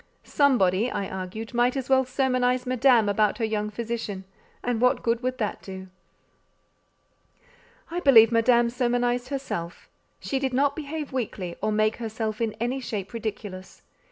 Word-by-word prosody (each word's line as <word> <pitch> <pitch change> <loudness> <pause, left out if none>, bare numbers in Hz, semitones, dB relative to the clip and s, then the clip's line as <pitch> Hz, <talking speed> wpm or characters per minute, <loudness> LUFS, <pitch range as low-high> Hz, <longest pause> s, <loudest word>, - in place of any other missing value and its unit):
"Somebody," 235 -6 +2
I 200 - -3
argued, 190 +5 -6
"might 245 +2 +2
as 265 -1 -3
well 265 -1 +4
sermonize 255 -1 +1
Madame 250 -3 +4
about 210 0 +2
her 230 - 0
young 210 -1 -2
physician: 220 -3 -4 0.4
and 240 -2 -1
what 250 0 +3
good 230 0 +1
would 255 0 -2
that 215 -4 -3
do?" 190 -1 -9 2.0
I 350 - -2
believe 235 -8 +7
Madame 235 +1 +3
sermonized 245 0 0
herself. 220 -12 -5 0.3
She 270 - -2
did 265 -2 -1
not 280 +1 +2
behave 300 -1 -5
weakly, 195 -8 -3
or 215 +1 0
make 215 +1 +1
herself 220 -1 -4
in 225 -2 0
any 245 +4 -1
shape 210 -5 -5
ridiculous. 205 -4 -6
235 Hz, 150 wpm, -25 LUFS, 215-255 Hz, 2.0 s, believe